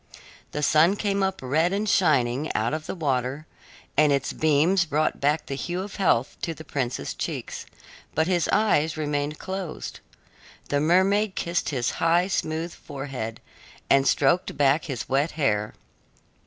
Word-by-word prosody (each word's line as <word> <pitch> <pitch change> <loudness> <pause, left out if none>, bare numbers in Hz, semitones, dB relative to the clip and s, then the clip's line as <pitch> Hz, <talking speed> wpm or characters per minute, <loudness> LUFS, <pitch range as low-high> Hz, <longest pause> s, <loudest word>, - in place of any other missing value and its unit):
The 150 - -3
sun 160 +6 +4
came 200 -1 -1
up 190 0 -1
red 155 +7 +2
and 205 +2 -1
shining 145 -7 +2
out 115 +5 0
of 155 0 -4
the - - -4
water, 135 -2 -1 0.5
and 150 0 +4
its 140 -1 0
beams 160 +5 +3
brought 155 -1 -1
back 150 +2 +1
the - - -5
hue 175 +6 -3
of 200 - -8
health 145 -10 +1
to 165 - -3
the 160 - -10
prince's 130 -5 -3
cheeks, - - -5 0.5
but 160 - +3
his 175 -1 +1
eyes 160 -8 +2
remained 145 0 -2
closed. 190 -4 -6 0.7
The 145 - +1
mermaid 190 +6 +3
kissed 170 +1 -1
his 125 -5 -1
high, 170 +2 +4
smooth 160 -1 -2
forehead 135 -5 -6 0.5
and 135 0 +5
stroked 180 +2 +2
back 145 +2 +3
his 135 -7 -4
wet 140 +4 +1
hair. 105 -9 0
155 Hz, 155 wpm, -25 LUFS, 140-175 Hz, 0.7 s, and